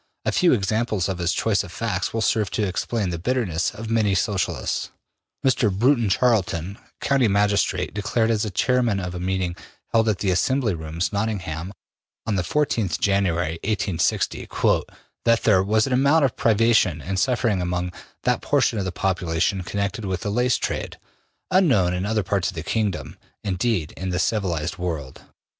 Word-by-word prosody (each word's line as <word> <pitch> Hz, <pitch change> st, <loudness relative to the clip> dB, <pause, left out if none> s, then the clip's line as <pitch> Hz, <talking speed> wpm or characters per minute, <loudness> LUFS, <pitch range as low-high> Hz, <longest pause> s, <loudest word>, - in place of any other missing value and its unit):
A -, -, +2 dB
few 180 Hz, -2 st, +3 dB
examples 110 Hz, -2 st, 0 dB
of 95 Hz, -2 st, -3 dB
his 85 Hz, 0 st, +1 dB
choice -, -, +1 dB
of -, -, -10 dB
facts -, -, -2 dB
will 115 Hz, -, -2 dB
serve 105 Hz, -1 st, +1 dB
to 105 Hz, -, +1 dB
explain 95 Hz, +1 st, -2 dB
the 85 Hz, -, -4 dB
bitterness 95 Hz, -5 st, 0 dB
of 110 Hz, +2 st, -7 dB
many 105 Hz, -4 st, +2 dB
Socialists: 90 Hz, -, -1 dB, 0.6 s
Mr. 125 Hz, -5 st, +3 dB
Broughton 120 Hz, +3 st, +2 dB
Charlton, 100 Hz, -4 st, +1 dB, 0.2 s
county 135 Hz, -4 st, +2 dB
magistrate, 100 Hz, -2 st, +1 dB
declared, 110 Hz, +2 st, 0 dB
as 110 Hz, -1 st, 0 dB
chairman 120 Hz, -5 st, +2 dB
of 90 Hz, -2 st, -4 dB
a 90 Hz, -, -5 dB
meeting 90 Hz, -1 st, -1 dB, 0.4 s
held 115 Hz, -1 st, +3 dB
at 105 Hz, -, +1 dB
the 95 Hz, -1 st, 0 dB
Assembly 120 Hz, +4 st, +1 dB
Rooms, 80 Hz, +3 st, -3 dB
Nottingham, 95 Hz, -5 st, -2 dB, 0.5 s
on 110 Hz, -, -1 dB
the 95 Hz, -, +1 dB
14th 115 Hz, -, 0 dB
January, 85 Hz, -5 st, +1 dB
1860, 95 Hz, -5 st, 0 dB
``that 115 Hz, -1 st, 0 dB
there 100 Hz, -4 st, +5 dB
was 110 Hz, +3 st, +2 dB
an 135 Hz, -, -1 dB
amount 140 Hz, +4 st, +4 dB
of 130 Hz, -, -1 dB
privation 110 Hz, -7 st, +3 dB
and 95 Hz, +5 st, -3 dB
suffering 115 Hz, -6 st, +1 dB
among 90 Hz, 0 st, -2 dB, 0.3 s
that -, -, +1 dB
portion 110 Hz, -, +1 dB
of 95 Hz, -, -2 dB
the 95 Hz, -, -2 dB
population 90 Hz, 0 st, 0 dB
connected 100 Hz, +3 st, -3 dB
with 95 Hz, -2 st, -2 dB
the 105 Hz, -, -2 dB
lace 125 Hz, +3 st, +2 dB
trade, -, -, -3 dB, 0.5 s
unknown 130 Hz, -, +4 dB
in 90 Hz, +2 st, -2 dB
other 110 Hz, -1 st, 0 dB
parts 95 Hz, -1 st, 0 dB
of 95 Hz, -, -8 dB
the 80 Hz, -, -4 dB
kingdom, 105 Hz, +2 st, -2 dB, 0.2 s
indeed, 95 Hz, -3 st, -1 dB
in 95 Hz, -, -3 dB
the 90 Hz, -, -1 dB
civilized 90 Hz, -5 st, -1 dB
world. 80 Hz, -7 st, -4 dB
100 Hz, 165 wpm, -23 LUFS, 90-115 Hz, 0.6 s, there